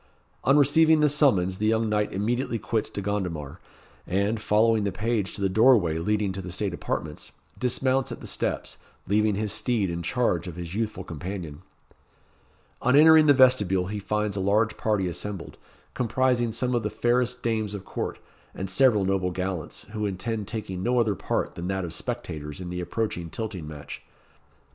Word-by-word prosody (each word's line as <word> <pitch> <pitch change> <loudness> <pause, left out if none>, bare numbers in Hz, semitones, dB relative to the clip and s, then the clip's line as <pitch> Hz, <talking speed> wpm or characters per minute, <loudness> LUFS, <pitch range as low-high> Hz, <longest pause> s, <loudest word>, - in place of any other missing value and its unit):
On 135 +2 +4
receiving 155 +2 +5
the 150 - +5
summons 100 - +2
the 110 - +1
young 110 0 +2
knight 105 -1 0
immediately 115 +4 -1
quits 110 -1 -1
De 100 - -5
Gondomar, 90 -8 -3 0.5
and, 100 +4 0
following 110 +1 +3
the 100 - 0
page 105 0 -1
to - - -6
the 100 - +3
doorway 100 -6 +4
leading 105 +2 0
to 95 +1 -5
the 90 -1 -7
state 100 0 -2
apartments, 75 -3 -4 0.3
dismounts 130 +1 +1
at - - -6
the - - -10
steps, - - -2 0.3
leaving 105 +1 +2
his 105 0 -1
steed 110 -4 0
in 85 0 -3
charge 90 -2 0
of 85 - -6
his 85 -1 -6
youthful 105 -3 -2
companion. 85 -2 -6 1.2
On 125 +2 +3
entering 155 +1 +7
the 145 - +7
vestibule 105 -9 +4
he 105 0 -3
finds 105 +1 -1
a - - -2
large 105 +3 +2
party 105 -4 0
assembled, 95 +1 -5 0.4
comprising 125 0 +1
some 125 +3 -1
of 120 - +1
the 105 - -2
fairest 125 +2 0
dames 110 -3 -1
of 100 - -8
court, - - -4 0.4
and 95 0 -3
several 110 -3 +4
noble 95 -1 +1
gallants, 90 -2 -4
who 105 -1 -2
intend 105 +2 -3
taking 105 -5 -5
no 125 +4 +2
other 110 -3 +2
part - - -2
than 85 +1 -5
that 95 -1 -1
of 85 - -5
spectators 80 - -5
in 90 -1 -6
the 90 0 -3
approaching 90 -2 -3
tilting 100 -6 -5
match. 75 -1 -8
105 Hz, 175 wpm, -26 LUFS, 95-115 Hz, 1.2 s, entering